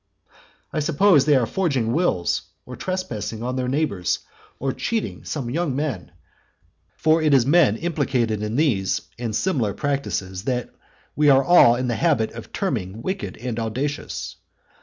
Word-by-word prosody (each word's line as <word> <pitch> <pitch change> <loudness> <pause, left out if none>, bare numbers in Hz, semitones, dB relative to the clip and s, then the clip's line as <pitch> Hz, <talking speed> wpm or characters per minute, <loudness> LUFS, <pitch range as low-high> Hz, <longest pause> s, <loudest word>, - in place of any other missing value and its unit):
I - - 0
suppose 155 0 +4
they 150 -1 +4
are 125 -3 +3
forging 135 -9 0
wills, 155 - +1 0.2
or 125 - -8
trespassing 120 - -4
on 125 +1 -2
their 130 -1 -1
neighbours, 125 - 0 0.4
or 135 0 -2
cheating 225 -2 -3
some 140 -6 -4
young 155 -2 -1
men; 135 - -3 0.9
for 160 +1 +3
it 150 -3 +4
is 125 -3 +4
men 145 -7 +4
implicated 130 -10 -1
in 105 +1 -3
these 125 -11 +1 0.2
and 115 -3 -3
similar 120 - 0
practices 110 -10 -3
that 125 -2 -2 0.4
we 150 -1 +4
are 135 -3 +6
in 125 0 -1
the 120 - 0
habit 145 -10 +2
of 115 -1 -10
terming 115 - -3
wicked 190 +1 -4
and 120 -1 -4
audacious. 130 +6 -4
130 Hz, 150 wpm, -23 LUFS, 115-155 Hz, 0.9 s, are